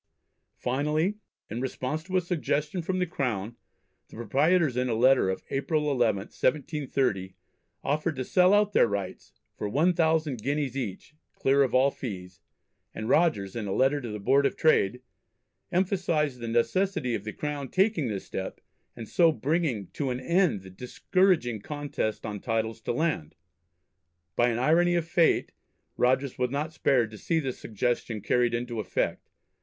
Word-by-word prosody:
Finally, 150 Hz, +10 st, 0 dB, 0.3 s
in 115 Hz, +4 st, -5 dB
response 130 Hz, +3 st, -3 dB
to 185 Hz, +2 st, -1 dB
a -, -, +3 dB
suggestion 165 Hz, -1 st, -1 dB
from 185 Hz, +3 st, -2 dB
the 180 Hz, -, +1 dB
Crown, 120 Hz, -, -3 dB, 0.5 s
the -, -, -15 dB
proprietors 140 Hz, -, +2 dB
in 125 Hz, 0 st, 0 dB
a 115 Hz, -, 0 dB
letter 125 Hz, -3 st, +4 dB
of 95 Hz, -, -3 dB
April 150 Hz, +3 st, 0 dB
11th, 110 Hz, -5 st, 0 dB
1730, 130 Hz, -, 0 dB, 0.5 s
offered 155 Hz, +3 st, 0 dB
to 130 Hz, -, -3 dB
sell 180 Hz, +6 st, +4 dB
out 205 Hz, 0 st, +3 dB
their -, -, +5 dB
rights 100 Hz, -3 st, -5 dB, 0.2 s
"for 105 Hz, -, -4 dB
one 160 Hz, -, +3 dB
thousand 160 Hz, -7 st, +1 dB
guineas 140 Hz, 0 st, -1 dB
each, 120 Hz, +1 st, -5 dB, 0.2 s
clear 140 Hz, +1 st, +3 dB
of 130 Hz, -2 st, +2 dB
all 135 Hz, +2 st, +4 dB
fees," 90 Hz, -10 st, -7 dB, 0.6 s
and 110 Hz, +2 st, -4 dB
Rogers 130 Hz, -, +2 dB
in 110 Hz, -3 st, -3 dB
a -, -, -3 dB
letter 135 Hz, +7 st, +2 dB
to 120 Hz, -, -6 dB
the 105 Hz, -, -4 dB
Board 140 Hz, +7 st, +3 dB
of -, -, -5 dB
Trade 125 Hz, -6 st, +2 dB, 0.7 s
emphasised 170 Hz, -7 st, 0 dB
the 120 Hz, -, -5 dB
necessity 130 Hz, +4 st, +1 dB
of 100 Hz, -, -2 dB
the 105 Hz, -, -5 dB
Crown 145 Hz, +1 st, -4 dB
taking 190 Hz, -, +2 dB
this 100 Hz, -4 st, -4 dB
step, 95 Hz, -, -5 dB, 0.4 s
and 115 Hz, -2 st, -8 dB
so 165 Hz, +5 st, +4 dB
bringing 140 Hz, -, -1 dB
to 140 Hz, -3 st, -2 dB
"an 125 Hz, 0 st, -2 dB
end 170 Hz, -, +2 dB
the 95 Hz, -, -11 dB
discouraging 125 Hz, -, +1 dB
contests 145 Hz, -6 st, -3 dB
on 105 Hz, -2 st, -4 dB
titles 115 Hz, 0 st, -2 dB
to -, -, -2 dB
land." 125 Hz, -, -1 dB, 1.0 s
By 120 Hz, 0 st, +3 dB
an 115 Hz, -, -1 dB
irony 170 Hz, +7 st, +3 dB
of 170 Hz, -1 st, 0 dB
fate 170 Hz, -1 st, +2 dB, 0.4 s
Rogers 130 Hz, +1 st, +1 dB
was 125 Hz, 0 st, +1 dB
not 150 Hz, +4 st, -3 dB
spared 125 Hz, -7 st, +2 dB
to 105 Hz, -, -10 dB
see 165 Hz, -, 0 dB
this 135 Hz, -5 st, -4 dB
suggestion 115 Hz, 0 st, -2 dB
carried 120 Hz, +3 st, +2 dB
into 120 Hz, -1 st, -3 dB
effect. 105 Hz, -, -2 dB
130 Hz, 165 wpm, -27 LUFS, 115-160 Hz, 1.0 s, their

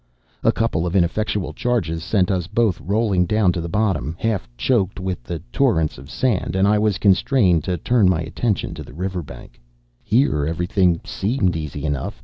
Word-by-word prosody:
A -, -, +5 dB
couple 100 Hz, -7 st, -1 dB
of 85 Hz, -, -3 dB
ineffectual 100 Hz, +3 st, 0 dB
charges 100 Hz, -10 st, -1 dB
sent 95 Hz, +1 st, +1 dB
us 90 Hz, -3 st, -1 dB
both 110 Hz, -3 st, +1 dB
rolling 100 Hz, -2 st, +1 dB
down 105 Hz, -3 st, +3 dB
to 85 Hz, -, -3 dB
the 85 Hz, -, -5 dB
bottom, 85 Hz, -, 0 dB
half 110 Hz, -2 st, -2 dB
choked 95 Hz, -, +1 dB
with 95 Hz, -5 st, -3 dB
the 85 Hz, +5 st, -4 dB, 0.2 s
torrents 80 Hz, -2 st, +1 dB
of 70 Hz, +1 st, -12 dB
sand; 115 Hz, -6 st, -1 dB
and 95 Hz, +1 st, +3 dB
I 105 Hz, 0 st, +3 dB
was 105 Hz, -3 st, +1 dB
constrained 95 Hz, -, +3 dB
to 90 Hz, -1 st, -1 dB
turn 110 Hz, +2 st, +3 dB
my 85 Hz, -3 st, +1 dB
attention 100 Hz, +6 st, -2 dB
to -, -, -7 dB
the -, -, -13 dB
river 90 Hz, +1 st, -3 dB
bank. 70 Hz, -, -12 dB, 0.4 s
Here 100 Hz, -, +2 dB
everything 85 Hz, +1 st, +1 dB
seemed 100 Hz, -4 st, 0 dB
easy 75 Hz, -2 st, -5 dB
enough. 70 Hz, -3 st, -3 dB
95 Hz, 180 wpm, -21 LUFS, 85-105 Hz, 0.4 s, A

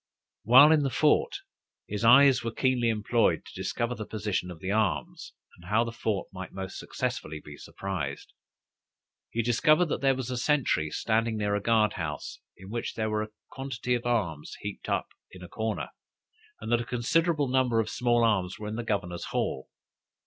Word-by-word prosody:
While 130 Hz, +7 st, +8 dB
in 155 Hz, -2 st, +5 dB
the 140 Hz, -, 0 dB
fort, 150 Hz, +4 st, +2 dB, 0.5 s
his 105 Hz, +1 st, -4 dB
eyes 130 Hz, +3 st, +7 dB
were 115 Hz, -, -2 dB
keenly 125 Hz, -1 st, +1 dB
employed 110 Hz, +1 st, +1 dB
to -, -, -12 dB
discover 120 Hz, +1 st, -2 dB
the 110 Hz, -3 st, -7 dB
position 105 Hz, -4 st, -2 dB
of 85 Hz, -3 st, -9 dB
the 95 Hz, +4 st, -3 dB
arms, 105 Hz, -3 st, -1 dB, 0.2 s
and 85 Hz, +1 st, -14 dB
how 110 Hz, +2 st, +3 dB
the 115 Hz, -, -4 dB
fort 110 Hz, -4 st, -2 dB
might 95 Hz, -1 st, -7 dB
most 95 Hz, -1 st, -6 dB
successfully 75 Hz, 0 st, -4 dB
be 75 Hz, -1 st, -11 dB
surprised. 85 Hz, -6 st, -5 dB, 1.0 s
He 115 Hz, -, -1 dB
discovered 155 Hz, +9 st, +3 dB
that -, -, -2 dB
there 135 Hz, -1 st, +3 dB
was 130 Hz, -1 st, -4 dB
a 125 Hz, -, -2 dB
sentry 125 Hz, -, +1 dB
standing 115 Hz, +4 st, 0 dB
near 105 Hz, -1 st, 0 dB
a 105 Hz, -, 0 dB
guard 110 Hz, 0 st, +3 dB
house, 75 Hz, -4 st, -5 dB, 0.2 s
in 95 Hz, +2 st, -11 dB
which 120 Hz, 0 st, -4 dB
there 110 Hz, -1 st, -1 dB
were 105 Hz, 0 st, 0 dB
a 110 Hz, -, -5 dB, 0.2 s
quantity 130 Hz, -2 st, -3 dB
of 120 Hz, 0 st, -1 dB
arms 85 Hz, -11 st, -1 dB
heaped -, -, -6 dB
up -, -, -1 dB, 0.2 s
in 90 Hz, -1 st, -12 dB
a -, -, -8 dB
corner, 110 Hz, +4 st, -3 dB, 0.7 s
and -, -, -6 dB
that 120 Hz, 0 st, +3 dB
a -, -, -5 dB
considerable 145 Hz, +6 st, +1 dB
number 125 Hz, -3 st, +2 dB
of 110 Hz, -, 0 dB
small 120 Hz, -1 st, +1 dB
arms 95 Hz, -5 st, +1 dB
were 105 Hz, -, -6 dB
in 110 Hz, +1 st, -4 dB
the 120 Hz, -, -3 dB
governor's 95 Hz, -6 st, -2 dB
hall. 65 Hz, -, -2 dB
115 Hz, 185 wpm, -28 LUFS, 100-125 Hz, 1.0 s, While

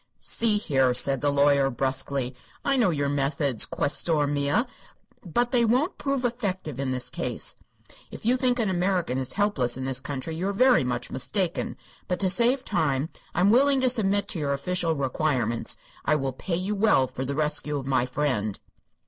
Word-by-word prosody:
"See 225 Hz, -2 st, +1 dB
here," 135 Hz, -10 st, +1 dB
said 135 Hz, +1 st, +3 dB
the 145 Hz, -, +2 dB
lawyer, 140 Hz, -1 st, +3 dB
brusquely; 130 Hz, 0 st, -1 dB, 0.3 s
"I 275 Hz, -, +2 dB
know 240 Hz, -7 st, +3 dB
your 145 Hz, -4 st, 0 dB
methods, 140 Hz, -3 st, +1 dB
questore 150 Hz, +1 st, 0 dB
mia, 145 Hz, -, +1 dB, 0.6 s
but 240 Hz, +7 st, 0 dB
they 245 Hz, -2 st, +3 dB
won't 255 Hz, -, +1 dB
prove 275 Hz, -3 st, -1 dB
effective 190 Hz, -, -3 dB
in 135 Hz, -1 st, -1 dB
this 130 Hz, -1 st, -3 dB
case. -, -, -1 dB, 0.5 s
If -, -, -10 dB
you 245 Hz, +2 st, +4 dB
think 250 Hz, -1 st, +2 dB
an 230 Hz, -3 st, +1 dB
American 180 Hz, -7 st, 0 dB
is 130 Hz, -, -3 dB
helpless 135 Hz, -13 st, +1 dB
in 130 Hz, -, -4 dB
this 135 Hz, -1 st, -1 dB
country 145 Hz, +4 st, -4 dB
you 180 Hz, +4 st, -2 dB
are 200 Hz, -, -1 dB
very 250 Hz, -, +4 dB
much 125 Hz, -1 st, -2 dB
mistaken. 175 Hz, +6 st, -2 dB, 0.3 s
But, 180 Hz, -, -1 dB
to 190 Hz, -2 st, +3 dB
save 245 Hz, +5 st, +2 dB
time, 145 Hz, -2 st, 0 dB, 0.3 s
I -, -, +1 dB
am 195 Hz, +3 st, +5 dB
willing 275 Hz, +3 st, +4 dB
to 255 Hz, -, +3 dB
submit 205 Hz, -4 st, +1 dB
to 170 Hz, -, -1 dB
your 140 Hz, -2 st, 0 dB
official 170 Hz, +2 st, 0 dB
requirements. 130 Hz, -4 st, -1 dB, 0.3 s
I 155 Hz, -, +2 dB
will 135 Hz, -3 st, -2 dB
pay 170 Hz, +7 st, -3 dB
you 185 Hz, +4 st, -2 dB
well 205 Hz, -10 st, +3 dB
for 130 Hz, +1 st, -6 dB
the 140 Hz, +1 st, -3 dB
rescue 150 Hz, -1 st, -1 dB
of 135 Hz, -, -5 dB
my 130 Hz, -2 st, +1 dB
friend." 125 Hz, -7 st, -1 dB
155 Hz, 185 wpm, -26 LUFS, 135-205 Hz, 0.6 s, am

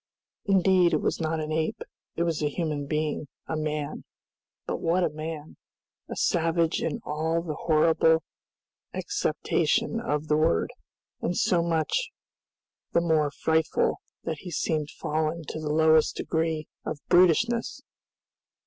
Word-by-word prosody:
Indeed 190 Hz, -3 st, +4 dB
it -, -, +2 dB
was -, -, 0 dB
not 160 Hz, 0 st, 0 dB
an 155 Hz, 0 st, -3 dB
ape; 160 Hz, 0 st, -1 dB, 0.4 s
it 170 Hz, -, +1 dB
was 165 Hz, -3 st, -1 dB
a 150 Hz, -, +1 dB
human 150 Hz, -2 st, -2 dB
being, 150 Hz, 0 st, -1 dB, 0.2 s
a -, -, -3 dB
man. 155 Hz, -1 st, -3 dB, 0.6 s
But -, -, -2 dB
what 175 Hz, +2 st, +2 dB
a 160 Hz, -, +1 dB
man! 155 Hz, 0 st, -6 dB, 0.5 s
A -, -, -4 dB
savage 165 Hz, -1 st, +1 dB
in 155 Hz, -, -2 dB
all 160 Hz, +2 st, -1 dB
the 160 Hz, -3 st, -3 dB
horrible 160 Hz, +1 st, +3 dB, 0.7 s
acceptation -, -, 0 dB
of 150 Hz, +1 st, -2 dB
the 150 Hz, -, +3 dB
word, 120 Hz, -, +2 dB, 0.5 s
and 175 Hz, -, -1 dB
so 185 Hz, -6 st, +3 dB
much 170 Hz, -, 0 dB, 0.8 s
the 170 Hz, -, +4 dB
more 160 Hz, -3 st, +2 dB
frightful 160 Hz, +2 st, +1 dB, 0.2 s
that 160 Hz, -2 st, -3 dB
he 180 Hz, -, -8 dB
seemed 155 Hz, -2 st, -1 dB
fallen 155 Hz, +2 st, -2 dB
to -, -, -4 dB
the 155 Hz, -1 st, -3 dB
lowest 155 Hz, 0 st, +4 dB
degree 160 Hz, -1 st, -1 dB, 0.2 s
of -, -, -3 dB
brutishness! 185 Hz, +7 st, +3 dB
160 Hz, 140 wpm, -27 LUFS, 155-170 Hz, 0.8 s, Indeed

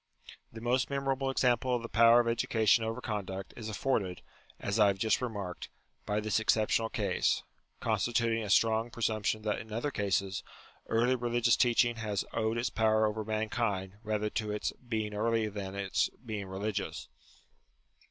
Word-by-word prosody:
The 110 Hz, -, -9 dB
most 125 Hz, +2 st, +1 dB
memorable 135 Hz, -1 st, -1 dB
example 125 Hz, -1 st, +2 dB
of 120 Hz, -, -3 dB
the -, -, -4 dB
power 115 Hz, +1 st, +6 dB
of 120 Hz, -, +1 dB
education 115 Hz, -1 st, +3 dB
over 115 Hz, +2 st, -3 dB
conduct, 95 Hz, -4 st, -4 dB
is 110 Hz, -2 st, -6 dB
afforded 105 Hz, -5 st, -1 dB, 0.4 s
(as 100 Hz, +2 st, -1 dB
I 105 Hz, -, +7 dB
have 100 Hz, -1 st, +1 dB
just 110 Hz, +4 st, +1 dB
remarked) 100 Hz, -7 st, -5 dB, 0.4 s
by 105 Hz, 0 st, +1 dB
this 105 Hz, 0 st, +1 dB
exceptional 110 Hz, +1 st, +2 dB
case; 100 Hz, -5 st, 0 dB, 0.4 s
constituting 115 Hz, -1 st, +1 dB
a 105 Hz, -, -5 dB
strong 110 Hz, +2 st, +3 dB
presump 110 Hz, -3 st, -2 dB
tion 110 Hz, -1 st, 0 dB
that 105 Hz, -1 st, -1 dB
in 110 Hz, -, -10 dB
other 120 Hz, +7 st, -2 dB
cases, 100 Hz, -1 st, -1 dB, 0.5 s
early 120 Hz, +3 st, +2 dB
religious 120 Hz, -1 st, +2 dB
teaching 120 Hz, -1 st, +3 dB
has 105 Hz, -3 st, -2 dB
owed 110 Hz, 0 st, 0 dB
its 115 Hz, -, -1 dB
power 110 Hz, -1 st, +3 dB
over 110 Hz, 0 st, -1 dB
mankind 110 Hz, -3 st, -1 dB
rather 105 Hz, -1 st, -1 dB
to 110 Hz, -2 st, -2 dB
its 105 Hz, -, -1 dB
being 110 Hz, -4 st, -4 dB
early 110 Hz, +1 st, +1 dB
than 100 Hz, -2 st, -6 dB
to 100 Hz, -, -5 dB
its 95 Hz, -, +1 dB, 0.2 s
being 105 Hz, -4 st, -4 dB
religious. 95 Hz, -7 st, -3 dB
110 Hz, 165 wpm, -31 LUFS, 105-115 Hz, 0.5 s, I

